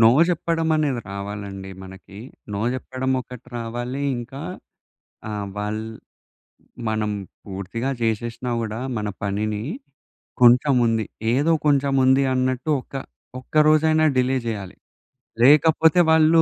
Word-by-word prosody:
No 115 Hz, 0 st, +8 dB, 0.2 s
జెప్పడం 165 Hz, -2 st, 0 dB
అనేది 145 Hz, -6 st, 0 dB
రావాలండి 100 Hz, -1 st, -6 dB
మనకి. 95 Hz, +1 st, -12 dB, 0.3 s
నో 100 Hz, -, -2 dB
జెప్పడం 130 Hz, 0 st, -3 dB
ఒకటి 125 Hz, 0 st, -11 dB
రావాలి. 120 Hz, +4 st, -4 dB, 0.2 s
ఇంకా 125 Hz, +3 st, -8 dB, 0.9 s
ఆహ్, 105 Hz, -1 st, -4 dB
వాళ్ 105 Hz, +1 st, -3 dB, 1.1 s
మనం 110 Hz, -1 st, -1 dB, 0.3 s
పూర్తిగా 100 Hz, +6 st, -4 dB
జేసేశ్నా 115 Hz, +2 st, -2 dB
కూడా 110 Hz, 0 st, -4 dB, 0.2 s
మన 105 Hz, -1 st, -2 dB
పనిని, 105 Hz, +1 st, -2 dB, 0.8 s
కొంచెం 125 Hz, +4 st, +6 dB
ఉంది 115 Hz, -1 st, +1 dB, 0.3 s
ఏదో 145 Hz, +6 st, +2 dB
కొంచెం 140 Hz, -1 st, +3 dB
ఉంది 130 Hz, +1 st, +5 dB
అన్నట్టు 130 Hz, +2 st, -1 dB
ఒక్క 135 Hz, -, -14 dB, 0.4 s
ఒక్క 130 Hz, -, -16 dB
రోజైనా 155 Hz, 0 st, +4 dB
డిలే 130 Hz, +1 st, +2 dB
జేయాలి. 100 Hz, -5 st, -4 dB, 0.7 s
లేకపోతే, 160 Hz, +5 st, +5 dB
వాళ్ళు 160 Hz, +1 st, +6 dB
120 Hz, 115 wpm, -23 LUFS, 105-140 Hz, 1.1 s, నో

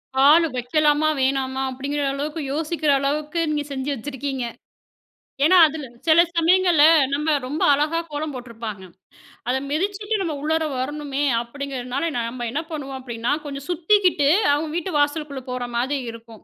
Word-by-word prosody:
கால் 295 Hz, +5 st, +6 dB
வைக்கலாமா? 295 Hz, +4 st, +2 dB
வேணாமா? 265 Hz, 0 st, 0 dB
அப்பிடிங்கிற 280 Hz, +3 st, -3 dB
அளவுக்கு 300 Hz, +3 st, -4 dB
யோசிக்கிற 310 Hz, -1 st, 0 dB
அளவுக்கு 300 Hz, +4 st, -2 dB
நீங்க 295 Hz, -1 st, -1 dB
செஞ்சு 270 Hz, +1 st, -3 dB
வச்சிருக்கீங்க. 270 Hz, 0 st, -4 dB, 1.0 s
ஏன்னா, 365 Hz, +4 st, +6 dB
அதில 305 Hz, -1 st, -6 dB, 0.2 s
சில 330 Hz, +2 st, +7 dB
சமயங்கள்ல 345 Hz, -2 st, +4 dB, 0.3 s
நம்ம 300 Hz, +2 st, +1 dB
ரொம்ப 295 Hz, +4 st, -4 dB
அழகா 300 Hz, +4 st, +1 dB
கோலம் 295 Hz, 0 st, -3 dB
போட்டிருப்பாங்க. 230 Hz, -5 st, -7 dB, 0.7 s
அத 255 Hz, -, +2 dB
மிதிச்சிட்டு 405 Hz, +7 st, -1 dB
நம்ம 325 Hz, -5 st, -2 dB
உள்ளர 315 Hz, +1 st, 0 dB
வரணுமே 290 Hz, +1 st, -3 dB, 0.2 s
அப்பிடிங்கிறனால 270 Hz, +3 st, -4 dB
நம்ம 235 Hz, +1 st, -3 dB
என்ன 295 Hz, +6 st, -2 dB
பண்ணுவோம் 275 Hz, -3 st, -5 dB
அப்பிடின்னா, 235 Hz, -1 st, -2 dB
கொஞ்சம் 280 Hz, -1 st, -7 dB
சுத்திக்கிட்டு 355 Hz, -3 st, +3 dB, 0.2 s
அவுங்க 305 Hz, +2 st, -1 dB
வீட்டு 345 Hz, 0 st, -3 dB
வாசலுக்குள்ளே 290 Hz, -2 st, -1 dB
போறமாரி 250 Hz, +2 st, -2 dB
இருக்கும். 230 Hz, -1 st, -13 dB
290 Hz, 130 wpm, -22 LUFS, 260-315 Hz, 1.0 s, சில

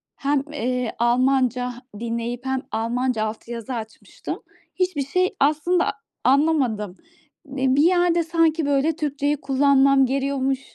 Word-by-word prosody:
hem, 280 Hz, 0 st, 0 dB
eee, 250 Hz, -3 st, -2 dB
Almanca 250 Hz, 0 st, +2 dB, 0.3 s
dinleyip 235 Hz, +2 st, -4 dB
hem 265 Hz, 0 st, -1 dB
Almanca 230 Hz, +1 st, -1 dB
altyazı 230 Hz, +2 st, -6 dB
açmıştım. 220 Hz, -1 st, -7 dB, 0.4 s
Hiçbir 365 Hz, -7 st, -1 dB
şey 365 Hz, +5 st, 0 dB
aslında 310 Hz, +5 st, +2 dB, 0.4 s
anlamadım. 255 Hz, -, +2 dB, 0.6 s
Eee, 260 Hz, 0 st, +2 dB
bir 290 Hz, -, +4 dB
yerde 350 Hz, -1 st, +3 dB
sanki, 325 Hz, -1 st, +1 dB
böyle, 285 Hz, +2 st, +1 dB
Türkçeyi 290 Hz, -1 st, -1 dB
kullanmam 275 Hz, -1 st, +4 dB
geriyormuş, 270 Hz, 0 st, -1 dB
270 Hz, 110 wpm, -23 LUFS, 245-295 Hz, 0.6 s, bir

